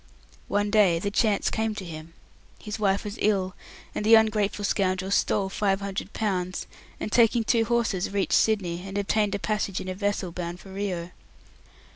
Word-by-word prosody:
One 205 0 0
day 200 -6 +5
the 200 +4 -2
chance 210 -1 +2
came 220 -1 -1
to 195 - -6
him. 165 0 -9 0.4
His 210 +1 -6
wife 200 -1 +1
was 210 +1 -6
ill, 190 -3 +1 0.4
and - - -3
the 225 +2 +7
ungrateful 210 -2 +2
scoundrel 190 -1 0
stole 200 0 +2
five 195 0 0
hundred 200 0 -4
pounds, 185 -4 -2 0.3
and - - -4
taking 235 0 +4
two 225 0 +2
horses 225 -5 0
reached 200 -1 0
Sydney, 185 -6 +2
and 195 +1 -5
obtained 205 0 +1
passage 210 -3 -1
in - - -7
a 185 - -2
vessel 200 -2 -2
bound 175 0 -5
for 190 +1 -12
Rio. 180 -3 -3
200 Hz, 170 wpm, -26 LUFS, 185-215 Hz, 0.4 s, the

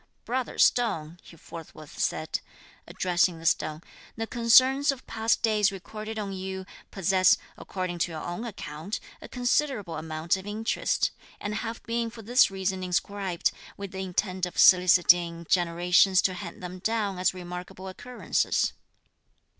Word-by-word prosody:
"Brother 255 +1 -3
stone," 170 -9 +2
he 165 - -15
forthwith 155 -2 -11
said, - - -1 0.5
addressing 175 -1 +1
the 165 - -11
stone, 155 0 0 0.3
"the 225 - -3
concerns 255 +5 +5
of 270 -2 -9
past 225 0 0
days 215 -2 +3
recorded 215 +3 -7
on 200 -2 -3
you 190 0 -5 0.2
possess, 185 -1 +3 0.2
according 185 -2 -5
to 170 - 0
your 155 -1 -6
own 175 +6 -5
account, 185 -4 -6 0.2
a - - -9
considerable 245 - 0
amount 160 +2 -1
of 190 +1 -9
interest, 220 +2 0 0.3
and 205 - -4
have 225 +1 -5
been 230 0 -2
for 225 0 -11
this 245 +5 +5
reason 190 -1 -2
inscribed, 185 0 -1 0.3
with 200 -1 -7
the 190 - -6
intent 185 0 -1
of 180 - -11
soliciting 175 -2 +5
generations 175 +2 +3
to 185 - +2
hand 180 -1 -8
them 180 +1 -7
down 205 -2 -1
as 185 +1 +1
remarkable 180 +1 -8
occurrences. 245 +6 -1
190 Hz, 145 wpm, -27 LUFS, 175-220 Hz, 0.5 s, concerns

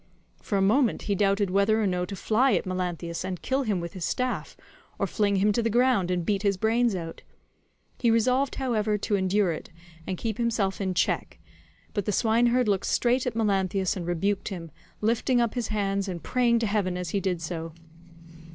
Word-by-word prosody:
For 200 - -1
a 195 - +2
moment 230 +5 +2
he 205 - 0
doubted 200 0 +1
whether 200 +3 +3
or 215 - +1
no 180 -2 0
to 195 - -6
fly 235 +7 +2
at - - +1
Melanthius 180 -2 -3
and 185 -2 -4
kill 265 +1 0
him 210 -8 0
with 170 0 -6
his 185 - -6
staff, 255 +7 -2 0.4
or - - 0
fling 205 -2 +1
him 200 +2 +3
to 235 - +1
the 230 - 0
ground 240 -5 +2
and 180 -2 -1
beat 200 0 0
his 200 -2 +1
brains 225 +1 +2
out; 165 -2 -6 0.8
he 235 - +2
resolved, 255 +4 +2
however, 220 -5 0
to 210 +1 -1
endure 190 0 +2
it 155 - -6 0.4
and 185 - -2
keep 220 +1 -3
himself 220 -5 0
in 190 -2 -1
check, - - 0 0.6
but 205 -3 -2
the - - 0
swineherd 235 +3 +2
looked 200 -2 +1
straight 250 +1 +1
at 240 - -2
Melanthius 195 -2 +1
and 175 -3 -5
rebuked 195 +3 -1
him, 170 -5 -6 0.3
lifting 235 +3 +2
up 235 -2 +1
his 245 -2 -2
hands 200 -2 -1
and 175 -3 -5
praying 245 -2 +2
to 230 - 0
heaven 200 -4 0
as 180 -3 -4
he 200 - +1
did 185 -2 -1
so. 165 0 -5
205 Hz, 200 wpm, -26 LUFS, 185-230 Hz, 0.8 s, whether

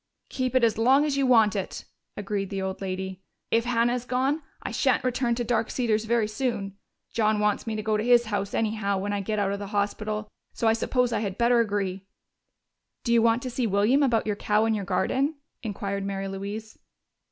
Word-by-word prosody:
"Keep 255 -1 -2
it 255 - +4
as 225 -1 +3
long 265 +5 +5
as 295 -2 0
you 275 -1 +2
want 225 -5 +5
it," 195 -2 -4 0.3
agreed 200 -1 -3
the 195 - -3
old 190 0 -4
lady. 190 0 -4 0.3
"If 230 +1 +2
Hannah 240 0 +2
is 250 -1 -2
gone, 265 +5 0 0.2
I - - -4
shan't - - +2
return 250 -1 0
to 240 - -2
Dark 230 -1 0
Cedars 225 -3 0
very 230 -1 +2
soon. 215 -4 -3 0.4
John 215 -1 +2
wants 210 +2 0
me 220 - -2
to 215 - -3
go 215 0 +1
to 210 - -1
his 240 0 +5
home, 205 -2 -1
anyhow, 215 -3 0
when 205 +2 -2
I 200 - -1
get 215 +2 -2
out 200 -1 +1
of 200 - -3
the 200 - -5
hospital, 210 +1 -2 0.3
so 230 - 0
I 225 - +5
suppose 245 +1 0
I - - +1
had 200 -3 -3
better 235 0 +4
agree." 200 -3 -1 1.0
"Do 235 - +1
you 230 - +5
want 230 +1 +3
to 255 - -4
see 245 -1 0
William 210 +8 +3
about 240 -5 +2
your 210 -1 0
cow 210 +2 +1
and 225 -1 +2
your 200 -2 -3
garden?" 260 +11 0 0.3
inquired 200 -3 -3
Mary 195 0 -3
Louise. 200 +3 -6
215 Hz, 215 wpm, -26 LUFS, 200-240 Hz, 1.0 s, long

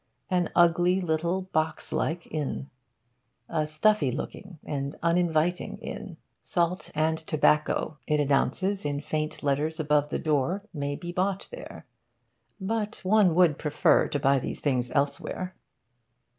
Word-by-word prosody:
An 180 -2 +2
ugly 175 +2 +4
little 170 +2 0
box 160 -3 -2
like 170 +1 -1
inn. 145 -2 -3 0.8
A 155 -2 -1
stuffy 155 -1 +2
looking 180 +7 -6
and 140 -1 -3
uninviting 170 0 +1
inn. - - -7 0.2
Salt 175 +1 -1
and 160 +1 +1
tobacco, 155 -1 +1
it 150 0 +2
announces 150 +8 +1
in 145 -1 -1
faint 155 +1 -3
letters 150 +3 0
above 150 -1 +2
the - - -1
door, 155 +6 0
may 145 -2 -2
be 175 +3 -6
bought 190 +2 -1
there. - - -9 0.7
But 210 0 -3
one 190 -4 +4
would 175 -5 +4
prefer 150 -2 +3
to 145 - -2
buy 140 0 +3
these - - -5
things 125 -4 0
elsewhere. 155 +6 -2
160 Hz, 130 wpm, -27 LUFS, 145-180 Hz, 0.8 s, ugly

